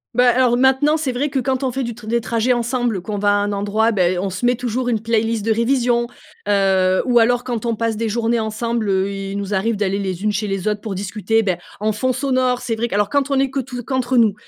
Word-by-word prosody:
Bah, 250 Hz, +1 st, +4 dB
alors, 245 Hz, 0 st, +3 dB
maintenant, 265 Hz, +4 st, +3 dB
c'est 300 Hz, -4 st, -2 dB
vrai 265 Hz, +4 st, -1 dB
que 275 Hz, -, -3 dB
quand 260 Hz, 0 st, 0 dB
on 260 Hz, -, 0 dB
fait 265 Hz, +2 st, -2 dB
du 235 Hz, -1 st, -4 dB
t 220 Hz, -1 st, -13 dB
des 235 Hz, +2 st, +1 dB
trajets 230 Hz, +1 st, 0 dB
ensemble, 240 Hz, -3 st, -1 dB
qu'on 205 Hz, +3 st, -4 dB
va 205 Hz, 0 st, +2 dB
à -, -, +5 dB
un 205 Hz, -, -1 dB
endroit, 205 Hz, +3 st, +1 dB
beh, 185 Hz, -4 st, +1 dB
on 190 Hz, +2 st, -2 dB
se 185 Hz, +5 st, -6 dB
met 245 Hz, +1 st, +3 dB
toujours 245 Hz, +1 st, -2 dB
une 225 Hz, -3 st, +1 dB
playlist 225 Hz, -1 st, 0 dB
de 225 Hz, -, +2 dB
révision. 240 Hz, +1 st, +1 dB, 0.4 s
Heu 190 Hz, -2 st, +2 dB
ou 245 Hz, -2 st, +4 dB
alors 245 Hz, +1 st, +3 dB
quand 240 Hz, -2 st, -3 dB
on 230 Hz, -, 0 dB
passe 230 Hz, 0 st, -1 dB
des 225 Hz, +1 st, -2 dB
journées 230 Hz, +1 st, 0 dB
ensemble, 220 Hz, 0 st, -2 dB
heu, 190 Hz, 0 st, +1 dB
il 195 Hz, 0 st, -5 dB
nous 200 Hz, 0 st, -4 dB
arrive 215 Hz, +4 st, 0 dB
d'aller 200 Hz, -1 st, -1 dB
les 190 Hz, -1 st, -4 dB
unes 210 Hz, -, +2 dB
chez 210 Hz, +1 st, -2 dB
les 195 Hz, 0 st, -3 dB
autres 210 Hz, -1 st, -1 dB
pour 210 Hz, -3 st, -5 dB
discuter, 210 Hz, +3 st, 0 dB
beh, 185 Hz, -4 st, 0 dB, 0.2 s
en 215 Hz, +1 st, 0 dB
fond 235 Hz, +5 st, 0 dB
sonore. 255 Hz, -1 st, 0 dB
C'est 225 Hz, -, -2 dB
vrai 230 Hz, +2 st, -1 dB
que 215 Hz, -, -4 dB
alors 205 Hz, 0 st, +1 dB
quand 285 Hz, -1 st, +1 dB
on 280 Hz, -, +1 dB
est 270 Hz, -1 st, +1 dB
que 275 Hz, -, -2 dB
tout 250 Hz, -1 st, -6 dB
qu'entre 260 Hz, 0 st, -1 dB
nous, 225 Hz, -3 st, +4 dB
230 Hz, 265 wpm, -19 LUFS, 205-245 Hz, 0.4 s, à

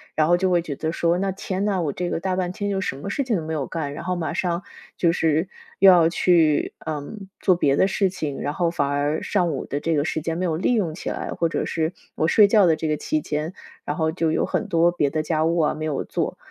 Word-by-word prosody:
然 155 Hz, 0 st, +3 dB
后 175 Hz, -, +5 dB
就 190 Hz, 0 st, +1 dB
会 175 Hz, -1 st, +3 dB
觉 150 Hz, -4 st, -5 dB
得 160 Hz, +3 st, -2 dB
说， 170 Hz, +1 st, +1 dB
那 195 Hz, 0 st, 0 dB
天 190 Hz, 0 st, -3 dB
哪， 200 Hz, -3 st, +1 dB
我 145 Hz, -4 st, -1 dB
这 180 Hz, -1 st, -3 dB
个 -, -, -2 dB
大 185 Hz, +1 st, -1 dB
半 180 Hz, -1 st, -1 dB
天 205 Hz, +2 st, -3 dB
就 195 Hz, -, -1 dB
什 135 Hz, -, -2 dB
么 145 Hz, -, -6 dB
事 275 Hz, +7 st, -1 dB
情 240 Hz, -4 st, 0 dB
都 160 Hz, -, -4 dB
没 160 Hz, -, -3 dB
有 145 Hz, -4 st, -2 dB
干， 145 Hz, -4 st, -4 dB
然 155 Hz, -, -7 dB
后 180 Hz, +1 st, -1 dB
马 160 Hz, -4 st, -3 dB
上 175 Hz, 0 st, -1 dB, 0.3 s
就 170 Hz, -2 st, +3 dB
是 160 Hz, +1 st, +1 dB, 0.3 s
又 195 Hz, 0 st, +9 dB
要 170 Hz, -2 st, +5 dB
去， 165 Hz, -4 st, +2 dB
呃， 150 Hz, -2 st, -3 dB, 0.4 s
做 185 Hz, -, +3 dB
别 140 Hz, -5 st, +2 dB
的 190 Hz, -, +3 dB
事 195 Hz, 0 st, +1 dB
情。 155 Hz, -7 st, -4 dB
然 145 Hz, -, -2 dB
后 170 Hz, 0 st, 0 dB
反 145 Hz, -5 st, 0 dB
而 145 Hz, +2 st, 0 dB
上 180 Hz, -4 st, 0 dB
午 -, -, -4 dB
的 145 Hz, -, -3 dB
这 165 Hz, +1 st, -1 dB
个 145 Hz, -, +2 dB
时 160 Hz, -, -2 dB
间 165 Hz, +1 st, -3 dB
没 185 Hz, -, -1 dB
有 160 Hz, -3 st, 0 dB
利 190 Hz, +8 st, +1 dB
用 180 Hz, -9 st, 0 dB
起 -, -, -5 dB
来， -, -, -4 dB
或 165 Hz, -1 st, 0 dB
者 -, -, -2 dB
是 160 Hz, +1 st, -1 dB, 0.2 s
我 160 Hz, -, +1 dB
睡 205 Hz, +4 st, +6 dB
觉 205 Hz, -2 st, +5 dB
的 165 Hz, -2 st, +4 dB
这 155 Hz, 0 st, -3 dB
个 150 Hz, -1 st, 0 dB
期 155 Hz, -, -1 dB
间， 150 Hz, +3 st, -3 dB, 0.3 s
然 -, -, -2 dB
后 160 Hz, -1 st, +1 dB
就 165 Hz, -2 st, 0 dB
有 -, -, +1 dB
很 215 Hz, -, -2 dB
多 170 Hz, -1 st, +3 dB
别 150 Hz, -5 st, 0 dB
的 155 Hz, +2 st, -1 dB
家 155 Hz, 0 st, 0 dB
务 170 Hz, +1 st, +1 dB
啊， 155 Hz, -, +2 dB
没 155 Hz, +1 st, -4 dB
有 150 Hz, -3 st, -2 dB
做。 -, -, -3 dB
165 Hz, 300 characters per minute, -23 LUFS, 155-185 Hz, 0.4 s, 又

